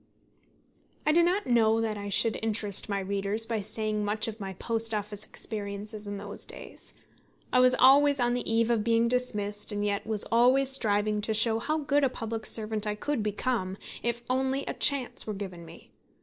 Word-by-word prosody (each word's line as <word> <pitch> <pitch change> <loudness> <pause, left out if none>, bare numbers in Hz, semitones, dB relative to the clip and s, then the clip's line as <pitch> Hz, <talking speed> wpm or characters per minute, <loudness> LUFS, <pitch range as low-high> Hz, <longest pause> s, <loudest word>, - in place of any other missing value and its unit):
I 305 - +3
do 340 +3 +4
not 360 +4 +1
know 225 -2 +2
that 225 -1 -2
I 205 0 -6
should 220 +3 +3
interest 210 -2 +2
my 200 -1 -1
readers 200 +3 0
by 225 -1 -2
saying 215 +1 -2
much 210 +2 0
of 225 0 -7
my 195 -2 -6
Post 225 +2 -2
Office 210 0 -4
experiences 210 0 -5
in 205 0 -5
those 205 +1 -8
days. - - -5 0.6
I 255 - +4
was 255 0 +5
always 280 +2 +5
on 240 0 +1
the 245 -2 -3
eve 230 +1 +2
of 225 -3 +1
being 230 +1 +2
dismissed, 210 -5 -2
and 205 0 -2
yet 205 +1 -2
was 215 -2 -1
always 255 +3 +4
striving 210 -4 +1
to 220 +1 -2
show 225 +1 +3
how 310 +6 -2
good 290 -1 0
a 270 - +3
public 225 -2 -4
servant 215 -1 +2
I 210 - -2
could 290 +3 -3
become, 210 -2 -2 0.2
if 235 0 -3
only 265 +2 -1
a - - -4
chance 275 -6 +1
were 215 - -4
given 185 -4 -8
me. - - -15
220 Hz, 190 wpm, -27 LUFS, 205-245 Hz, 0.6 s, was